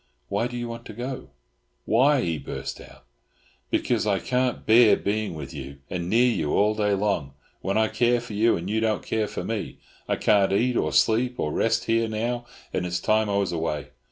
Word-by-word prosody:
"Why 105 +4 0
do 120 0 -6
you 120 0 -3
want 115 0 -7
to 110 - -8
go?" 125 +4 -6 0.6
"Why?" 130 +5 +4
he 80 -7 -1
burst 70 - -6
out. - - -15 0.6
"Because - - 0
I 100 -2 +2
can't 125 +4 -1
bear 115 0 +6
being 105 -3 -2
with 70 -3 -7
you 70 -1 -8
and 90 -1 -3
near 120 +4 +4
you 75 -7 -1
all 105 +1 +3
day 105 -1 +1
long, 95 -9 -1 0.3
when 100 +2 -1
I 110 0 +3
care 120 +2 +2
for 115 -2 -9
you, 110 +3 +3
and 85 - -6
you 110 +2 0
don't 110 -2 0
care 110 -1 0
for - - -5
me. 110 -2 -4 0.3
I - - +1
can't 100 -2 +3
eat, 120 +5 +2
or - - +1
sleep, 120 +3 +2
or 75 - -1
rest 115 0 +1
here 115 0 +2
now, 120 +2 -2 0.3
and 90 - -1
it's 90 0 -2
time 110 +2 +2
I 100 - +1
was 100 -3 0
away. 80 -4 -3
110 Hz, 210 wpm, -25 LUFS, 95-115 Hz, 0.6 s, bear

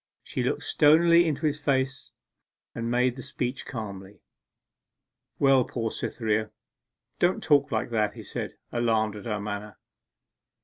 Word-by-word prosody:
She - - -3
looked - - -1
stonily 170 +3 +5
into 155 0 -1
his 150 0 0
face 135 -2 -1 0.6
and 115 0 -3
made 125 +1 +2
the 130 - -7
speech 125 +1 -4
calmly. 100 -4 -7 1.1
'Well, 135 -2 +5
poor 115 -2 -3
Cytherea, 110 -2 -1 0.7
don't 175 +1 +2
talk 145 -1 +3
like 110 +1 -1
that!' 105 -2 0
he - - -9
said, - - -5 0.2
alarmed 110 -3 +1
at 105 - -9
her 105 -3 -2
manner. 105 0 -5
120 Hz, 135 wpm, -27 LUFS, 110-140 Hz, 1.1 s, stonily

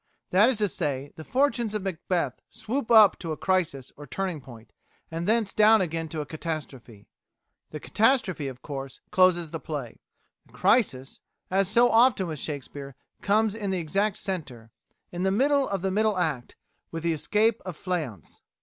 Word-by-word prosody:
That 205 +6 +5
is 260 - 0
to 210 -1 +1
say, 145 -6 -3
the 160 - -9
fortunes 245 - 0
of 210 - -2
Macbeth 175 -6 -2
swoop 255 +2 -4
up 220 -3 +7
to 165 -2 -5
a - - -7
crisis 165 -9 -1
or 145 0 -11
turning 180 0 -3
point, 120 -3 -14 0.4
and 165 +1 -3
thence 220 -2 +1
down 215 +1 +6
again 165 -3 -2
to 155 0 -4
a - - -5
catastrophe. 140 -10 -7 0.6
The 150 - -7
catastrophe, 210 - +1
of 130 -1 -9
course, 135 -2 -7
closes 180 -4 +3
the 165 - -4
play; 140 -6 -6 0.5
the - - -25
crisis, 135 - +1 0.3
as 195 0 +2
so 235 +5 +4
often 230 -4 +4
with 155 -4 -5
Shakespeare, 140 -2 -6 0.3
comes 215 +1 +2
in 210 -3 -3
its - - -1
exact 195 +6 0
centre, 140 - -5 0.4
in 175 - -5
the 190 - +2
middle 275 +7 +2
of 195 -2 -3
the 190 - 0
middle 215 0 +1
act, 155 -9 -2 0.3
with 165 0 -6
the 170 -1 +1
Escape 215 +8 +1
of 180 -4 -7
Fleance. 160 - -5
180 Hz, 175 wpm, -26 LUFS, 145-210 Hz, 0.6 s, up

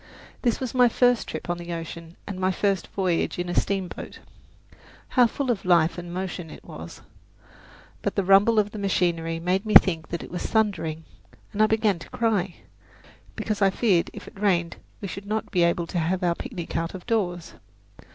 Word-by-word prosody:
This 240 -3 +1
was 255 -3 -4
my 250 -1 +5
first 245 0 +3
trip - - -6
on 175 0 -2
the 175 0 -5
ocean 165 0 -7
and 195 -2 -6
my 185 0 +2
first 195 0 0
voyage 185 -4 -1
in 175 0 -3
a - - -2
steamboat. 195 -2 -2 0.9
How 250 -2 +5
full 260 +2 -1
of 220 - -2
life 170 -2 +4
and 175 0 -8
motion 180 -2 -4
it - - -11
was! - - -9 1.0
But - - -2
the 200 - +1
rumble 200 +4 +5
of 210 -1 +2
the 215 - -7
machinery 170 -4 0
made 180 +3 0
me 215 -1 -1
think 165 -4 +6
it 170 - -5
was 180 - -3
thundering, 165 -8 0 0.5
and 210 - 0
I 215 - +6
began 215 -4 +2
to - - -11
cry, 205 -6 0 0.8
because 215 -1 -3
I 195 - +6
feared 190 -4 +2
if - - -10
it - - -12
rained 175 -5 +1 0.2
we 200 - -4
should 195 +1 -7
not 215 +1 -2
be 180 - +2
able 170 0 +2
to 175 - -2
have 180 +3 0
our 175 -1 +3
picnic 180 -4 -7
out 165 +2 -2
of 180 - -9
doors. 180 -7 -1
185 Hz, 190 wpm, -25 LUFS, 170-210 Hz, 1.0 s, think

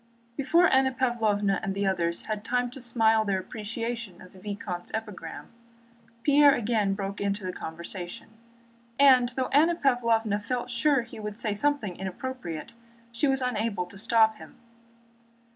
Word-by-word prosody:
Before 335 +7 +4
Anna 265 -2 +3
Pávlovna 220 -6 +1
and 195 -2 -3
the 200 0 -1
others 170 -3 0
had 215 -1 -4
time 245 +1 0
to 265 - -9
smile 225 -2 +3
their 200 -2 0
appreciation 225 +1 -5
of 185 - -14
the 190 - -14
vicomte's 195 -3 -5
epigram, 210 -7 -7 0.7
Pierre 290 0 +6
again 215 -5 0
broke 195 0 -5
into 200 0 -1
the 185 - -3
conversation, 175 +4 -7 0.7
and 260 -3 +6
though 260 -1 -1
Anna 325 +5 +4
Pávlovna 230 -7 +1
felt 245 +3 -3
sure 255 +2 +2
he 230 - -11
would 210 0 -6
say 215 -3 -1
something 215 -5 0
inappropriate, 190 -4 -6 0.4
she 235 +5 0
was 270 -1 +1
unable 220 -6 -1
to 180 +2 -12
stop 220 0 +3
him. - - -13
220 Hz, 150 wpm, -27 LUFS, 195-250 Hz, 0.7 s, Pierre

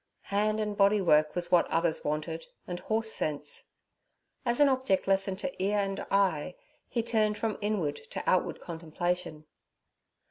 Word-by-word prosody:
Hand 215 +1 +2
and 210 -1 -2
body 200 +1 +4
work 155 -4 +3
was 175 0 -2
what 175 - +5
others 165 -1 0
wanted, 155 +2 -3 0.2
and 175 -1 -5
horse 220 +2 0
sense. 150 -5 0 0.8
As 240 +1 +1
an 290 - +7
object 260 -9 +1
lesson 195 0 +2
to 270 -1 -4
ear 205 +2 +1
and 195 -1 -1
eye, 190 -4 +1 0.3
he 235 - -1
turned 215 -2 +1
from 220 -2 -2
inward 190 -9 -1
to - - -4
outward 185 - +1
contemplation. 170 -1 -3
195 Hz, 150 wpm, -29 LUFS, 165-215 Hz, 0.8 s, an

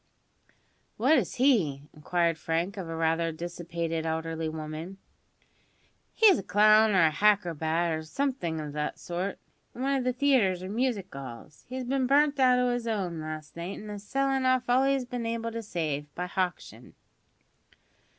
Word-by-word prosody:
"What 265 +8 +4
is 200 - -4
he?" 205 - +2
inquired 165 +1 0
Frank 165 +5 -1
of 185 -5 -6
a 165 - -4
rather 165 +1 +1
dissipated 170 0 -4
elderly 160 0 -2
woman. 155 +4 -6 1.2
"He's 415 -6 +6
a - - -3
clown 215 +2 +5
or 185 - +5
a 155 - +3
hacrobat, 170 -4 +1
or 160 0 -2
somethink 175 - -2
of 150 -1 -6
that 150 0 -3
sort, 180 +3 -4 0.4
in 250 - -5
one 275 +1 +1
of 265 - 0
the 255 - +1
theatres 245 -9 +2
or 185 - -5
music 220 - -2
'alls. 135 +2 -10
He's 260 0 -4
bin 260 +1 0
burnt 285 +1 +3
out 255 -1 +5
o' 250 -1 +2
his 240 -1 -3
'ome 185 -7 -2
last 155 -1 -7
night, 170 +3 -5
an's 210 0 -8
a 205 - -6
sellin' 270 -1 +1
off 255 -1 +3
all 255 +2 +4
he's 275 -2 +1
been 245 -2 -4
able 230 0 -2
to 230 0 -4
save, 155 -8 -3
by 180 - -3
hauction." 180 0 -4
190 Hz, 170 wpm, -28 LUFS, 165-250 Hz, 1.2 s, He's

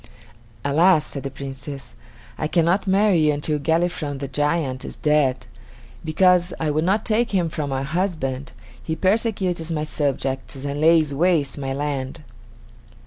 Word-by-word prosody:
"Alas!" 155 +3 +4
said 140 - -6
the 135 - -4
Princess, 135 0 -8 0.4
"I 155 - -2
cannot 175 +4 +2
marry 190 -5 +4
until 150 +1 0
Galifron, 160 -2 0
the 140 0 -5
giant, 145 -1 -1
is - - -7
dead. 135 -6 +1 0.6
Because 180 +2 +3
I 155 -2 0
would 155 +2 0
not 205 +4 +1
take 230 +2 +2
him 180 -4 +1
for 155 -2 -3
my 135 -1 -2
husband, 140 -5 -2 0.3
he 160 - -3
persecutes 190 -4 0
my 155 -2 -1
subjects 140 -3 -2
and 145 +1 -3
lays 160 -2 +4
waste 150 -3 +1
my 135 -1 -3
land." 140 +1 -3
155 Hz, 140 wpm, -22 LUFS, 140-175 Hz, 0.6 s, Alas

